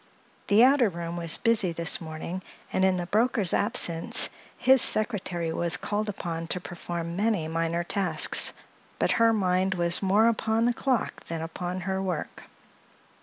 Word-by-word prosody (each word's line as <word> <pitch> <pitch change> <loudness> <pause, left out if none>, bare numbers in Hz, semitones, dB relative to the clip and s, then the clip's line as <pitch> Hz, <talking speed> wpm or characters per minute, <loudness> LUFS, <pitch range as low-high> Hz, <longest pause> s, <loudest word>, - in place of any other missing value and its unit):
The 205 +3 +5
outer 260 -3 +4
room 170 -1 -6
was 170 -2 0
busy 215 -7 +2
this 165 0 +1
morning, 160 +3 -6 0.3
and 190 - +1
in 190 -1 +3
the 175 - -3
broker's 215 -1 +1
absence 190 -7 +2 0.3
his 265 -1 +5
secretary 185 -7 +1
was 170 0 +1
called 210 +1 -3
upon 170 -4 -5
to 180 - -2
perform 170 -1 -6
many 205 -5 0
minor 165 +1 -1
tasks; 195 +2 -1 0.5
but - - +1
her 230 0 +5
mind 190 -2 +1
was 170 -1 +1
more 205 +3 +3
upon 225 0 +1
the 240 - +2
clock 255 -1 -2
than 165 -1 -5
upon 175 +3 -5
her 190 +1 -2
work. 180 -4 -5
185 Hz, 155 wpm, -26 LUFS, 170-215 Hz, 0.5 s, The